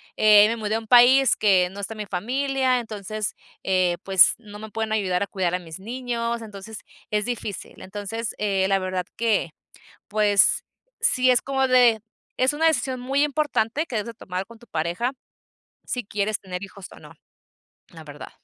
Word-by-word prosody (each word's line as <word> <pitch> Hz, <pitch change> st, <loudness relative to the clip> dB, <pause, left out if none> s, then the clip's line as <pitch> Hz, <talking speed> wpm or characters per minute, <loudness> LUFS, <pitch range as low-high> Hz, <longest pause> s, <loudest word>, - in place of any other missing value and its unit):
eh, 210 Hz, -1 st, +7 dB
me 230 Hz, -, -1 dB
mudé 215 Hz, -1 st, -2 dB
a -, -, 0 dB
un 225 Hz, -, -13 dB
país 250 Hz, +2 st, +6 dB
que 185 Hz, -4 st, +3 dB
no 200 Hz, -, -10 dB
está 200 Hz, -, -5 dB
mi 210 Hz, -1 st, -5 dB
familia, 255 Hz, +6 st, 0 dB
entonces, 215 Hz, -2 st, -5 dB, 0.3 s
eh 185 Hz, -2 st, +1 dB
pues, 190 Hz, -3 st, +6 dB
no 210 Hz, -3 st, -12 dB
me 220 Hz, 0 st, -8 dB
pueden 220 Hz, +1 st, -3 dB
ayudar 190 Hz, -4 st, 0 dB
a -, -, -4 dB
cuidar 185 Hz, -3 st, -2 dB
a 180 Hz, -, 0 dB
mis 165 Hz, -1 st, -10 dB
niños, 235 Hz, +1 st, -3 dB
entonces 215 Hz, 0 st, -9 dB, 0.3 s
es 210 Hz, -1 st, 0 dB
difícil. 230 Hz, -5 st, -6 dB
Entonces, 210 Hz, +4 st, -5 dB
eh, 195 Hz, -2 st, 0 dB
la 195 Hz, 0 st, +2 dB
verdad 185 Hz, -1 st, -3 dB
que, 220 Hz, -7 st, +1 dB, 0.6 s
pues 210 Hz, -2 st, +3 dB, 0.4 s
sí 255 Hz, 0 st, +3 dB
es 250 Hz, -1 st, +4 dB
como 270 Hz, -1 st, 0 dB
de 245 Hz, -3 st, +5 dB, 0.4 s
es 260 Hz, +2 st, +3 dB
una 315 Hz, +2 st, 0 dB
decisión 265 Hz, -5 st, 0 dB
muy 270 Hz, +3 st, +1 dB
importante 295 Hz, -2 st, 0 dB
que 260 Hz, -, -7 dB
debes 210 Hz, -, -3 dB
de 235 Hz, -, -7 dB
tomar 185 Hz, -3 st, -5 dB
con 230 Hz, -, -14 dB
tu 240 Hz, -, -18 dB
pareja, 170 Hz, +9 st, -2 dB, 0.7 s
sí 250 Hz, -1 st, -4 dB
quieres 205 Hz, +1 st, -1 dB
tener 180 Hz, -1 st, -7 dB
hijos 195 Hz, -1 st, -9 dB
o -, -, -13 dB
no, -, -, -14 dB, 0.8 s
la -, -, -12 dB
verdad. -, -, -10 dB
215 Hz, 180 wpm, -24 LUFS, 195-245 Hz, 0.8 s, eh